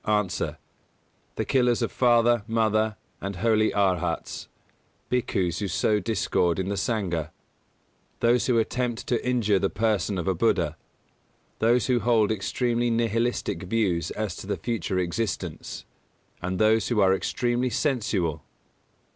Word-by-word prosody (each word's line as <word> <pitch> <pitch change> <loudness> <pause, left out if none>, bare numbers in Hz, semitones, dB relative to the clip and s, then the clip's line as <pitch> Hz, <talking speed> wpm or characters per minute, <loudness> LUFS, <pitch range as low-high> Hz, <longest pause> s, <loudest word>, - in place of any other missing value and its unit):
_ 105 -3 0
A. - - -2 0.8
The - - -2
killers 125 -2 +2
of 115 - -1
father, 120 -2 +3
mother, 110 -1 +1 0.3
and 100 0 -4
holy 110 +3 +2
Arhats; 95 -4 -1 0.6
Bhikkhus 95 -8 0
who 105 - -2
sow 105 +4 +1
discord 90 -4 0
in 95 0 -2
the 100 - -1
Sangha; 95 -7 -1 0.9
those 120 +1 +3
who 125 -3 +3
attempt 120 +1 -1
to 120 - -1
injure 115 -6 +2
the 95 - +1
person 105 -2 0
of 90 - -3
a 95 - +3
Buddha; 85 - +1 0.8
those 120 +2 +3
who 125 -2 +2
hold 110 -1 +3
extremely 120 +4 0
nihilistic 115 0 0
views 90 -4 0
as 105 -4 -3
to - - -8
the 105 - -1
future 105 -5 -2
existence; 90 +3 -3 0.6
and 90 +1 -2
those 110 +2 +3
who 120 -4 0
are 95 -1 +5
extremely 120 +5 0
sensual. 105 - -1
110 Hz, 140 wpm, -26 LUFS, 95-120 Hz, 0.9 s, are